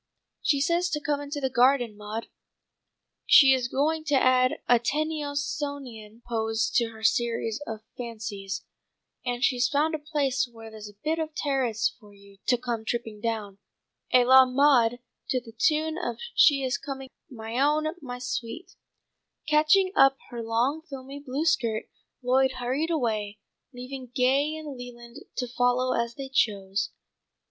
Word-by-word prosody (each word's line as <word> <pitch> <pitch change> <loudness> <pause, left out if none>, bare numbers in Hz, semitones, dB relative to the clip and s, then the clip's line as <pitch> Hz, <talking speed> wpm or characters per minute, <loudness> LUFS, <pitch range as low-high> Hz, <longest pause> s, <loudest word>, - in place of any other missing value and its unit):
"She 285 - +2
says 345 +4 +1
to 310 -3 -1
'come 290 0 -1
into 290 +1 -5
the 265 -2 -1
garden, 245 -2 +3
Maud.' 210 +2 -6 1.0
She 270 -2 +8
is 255 -2 0
going 310 +5 0
to 290 -1 +1
add 255 -1 +4
a 245 -1 +5
Tennysonian 285 -5 -3
pose 225 -1 0
to 235 - +3
her 220 -1 -10
series 230 0 0
of 220 -1 -5 0.2
Fancies, 215 -5 -5 0.6
and 245 0 -2
she's 245 -2 +2
found 305 +3 +1
a 315 - -1
place 280 -4 -1
where 225 -1 -11
there's 215 -1 -9
a 205 - -18
bit 320 +2 0
of 315 -1 -4
terrace 255 -6 0
for 205 -3 -17
you 200 0 -18
to 250 - +4
come 240 -2 -3
tripping 225 -2 -4
down, 210 -4 -3 0.5
à 250 -1 +6
la 260 +1 +8
Maud, 255 -3 +3 0.3
to 255 - +1
the 230 -2 -13
tune 315 +6 +1
of 235 -1 -3 0.2
'She 290 -6 +5
is 250 -2 -1
coming, 270 -2 -7 0.2
my 225 -1 -5
own, 300 +2 +3 0.2
my 250 -3 -6
sweet!'" 250 +6 -5 0.7
Catching 310 +6 +4
up 270 -4 +6
her 240 -1 -5
long 235 +7 0
filmy 275 -3 -9
blue 285 +2 -3
skirt, 235 -9 +1 0.4
Lloyd 260 +1 +3
hurried 255 +6 -2
away, 215 -9 -1 0.3
leaving 255 0 -8
Gay 270 +5 +2
and 305 -3 -7
Leland 240 -1 -10 0.2
to 250 - -2
follow 245 +1 +1
as 235 0 -1
they 275 -1 -6
chose. 200 -6 0
255 Hz, 155 wpm, -27 LUFS, 230-285 Hz, 1.0 s, She